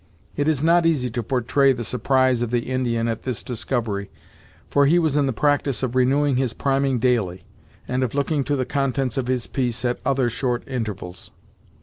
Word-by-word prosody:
It 145 - 0
is 155 -3 +1
not 170 +1 +4
easy 130 -7 0
to 120 +1 -2
portray 135 +3 +2
the 120 -2 -5
surprise 130 +1 +1
of 120 - -1
the 120 +1 -1
Indian 120 -3 0
at 115 -1 -2
this 125 -4 -4
discovery, 115 -4 -3 0.6
for 140 -1 +3
he 165 +4 +4
was 160 -4 +1
in 145 -2 +2
the - - +1
practice 145 0 0
of 125 -2 -1
renewing 135 +2 +2
his 130 -3 0
priming 135 -1 +1
daily, 110 -8 0 0.4
and 125 +1 -1
of 130 0 -1
looking 145 0 0
to 145 - 0
the 130 -2 -1
contents 135 -3 -1
of 130 -2 -2
his 125 -2 -1
piece 125 -2 -2
at 120 0 0
other 135 -1 +1
short 120 +1 -1
intervals. 105 -8 -5
130 Hz, 195 wpm, -23 LUFS, 120-140 Hz, 0.6 s, not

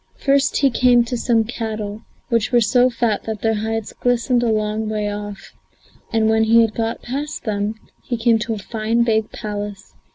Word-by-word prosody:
First 275 0 +2
he 275 -2 +3
came 245 0 +4
to 245 - -3
some 230 -1 +2
cattle, 220 -2 -5 0.3
which 230 -1 +1
were 240 - +5
so 245 +3 +4
fat 235 -4 -1
that 220 -2 -5
their 225 0 +2
hides 220 0 -3
glistened 245 0 +1
a 240 - +1
long 215 0 -1
way 210 -1 -1
off, 205 -1 -8 0.6
and 225 -1 +2
when 220 0 +3
he 230 +1 +6
had 225 -2 +1
got 225 0 -3
past 285 +5 -4
them 210 -1 -2 0.3
he 240 - -3
came 230 0 +3
to 225 0 -2
a - - -6
fine, 225 +2 0
big 220 -2 +1
palace. 205 -2 -6
225 Hz, 190 wpm, -20 LUFS, 215-240 Hz, 0.6 s, he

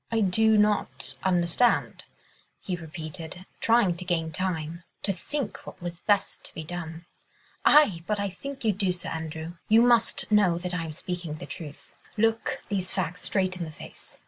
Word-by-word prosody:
"I 225 -1 +2
do 220 +3 +4
not 135 - +1
understand," 180 +6 +2 0.5
he 185 - -3
repeated, 165 +2 -7
trying 225 -6 +4
to 180 - -6
gain 165 -3 0
time, 170 -1 -2 0.2
to 195 - +1
think 255 +6 -4
what - - -9
was 175 -1 -5
best 205 0 +1
to - - -11
be 160 - -4
done. 165 0 -6 0.6
"Aye! 250 - +6
but 210 -1 0
I 200 - 0
think 270 +7 -7
you 220 - +5
do, 190 -2 +1
Sir 180 - -5
Andrew. 160 +1 -5
You 225 +2 +7
must 235 -2 +3
know 200 -5 +5
that 180 +1 -4
I 165 -2 -1
am 160 - -5
speaking 175 -1 -4
the - - -7
truth. 150 -5 -9 0.2
Look 225 +1 +1
these 190 -4 0
facts 180 -1 -2
straight 185 -2 0
in 175 - -3
the 160 - -5
face. 155 - -10
180 Hz, 175 wpm, -27 LUFS, 165-210 Hz, 0.6 s, You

